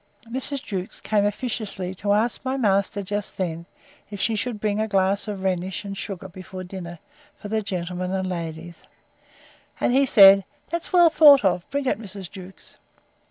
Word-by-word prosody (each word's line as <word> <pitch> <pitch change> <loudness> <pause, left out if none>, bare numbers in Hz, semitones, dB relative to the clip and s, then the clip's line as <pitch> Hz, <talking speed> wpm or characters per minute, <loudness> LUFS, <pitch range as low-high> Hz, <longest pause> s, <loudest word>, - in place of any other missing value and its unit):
Mrs. 265 +2 0
Jewkes 190 -3 -5
came 210 -1 +1
officiously 205 -4 -4
to 200 +2 -2
ask 220 +3 0
my 265 0 -2
master, 200 -3 +1
just 205 +1 -4
then, 170 -2 -3 0.4
if 205 -1 -7
she 225 - +1
should 220 0 -3
bring 210 0 -1
a 220 - 0
glass 195 0 +1
of 200 -2 -5
rhenish 185 +1 -2
and 200 0 -5
sugar 195 -1 -6
before 185 0 -9
dinner, 180 -2 -8 0.4
for 205 - -9
the 220 0 0
gentlemen 180 -2 -4
and 190 -1 -1
ladies: 170 -1 -6 1.0
And - - +1
he 275 +1 +4
said, 195 -4 +8 0.3
That's 340 0 -3
well 350 -3 +6
thought 285 -8 +7
of; 180 -2 0
bring 280 0 -2
it, 255 - 0
Mrs. 195 -4 -8
Jewkes. 190 -1 -11
195 Hz, 170 wpm, -23 LUFS, 185-220 Hz, 1.0 s, said